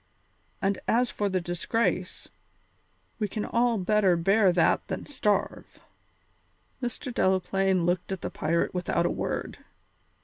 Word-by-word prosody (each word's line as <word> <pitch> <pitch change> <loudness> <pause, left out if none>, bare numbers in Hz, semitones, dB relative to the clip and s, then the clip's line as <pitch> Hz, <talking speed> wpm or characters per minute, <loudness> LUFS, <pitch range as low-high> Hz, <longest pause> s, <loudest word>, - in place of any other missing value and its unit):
And 195 0 +1
as 240 +2 +2
for 205 -1 -1
the 185 -1 0
disgrace, 175 +6 -2 0.9
we 210 - 0
can 210 +1 -4
all 235 -1 +1
better 195 -2 +3
bear 195 +3 +4
that 175 -1 +2
than 190 - -4
starve." 210 -8 -1 1.0
Mr. 245 +1 -4
Delaplaine 190 -2 +1
looked 175 +2 -1
at 190 - -3
the - - -4
pirate 170 +2 0
without 175 -1 0
a - - +1
word. - - -4
195 Hz, 130 wpm, -27 LUFS, 180-215 Hz, 1.0 s, bear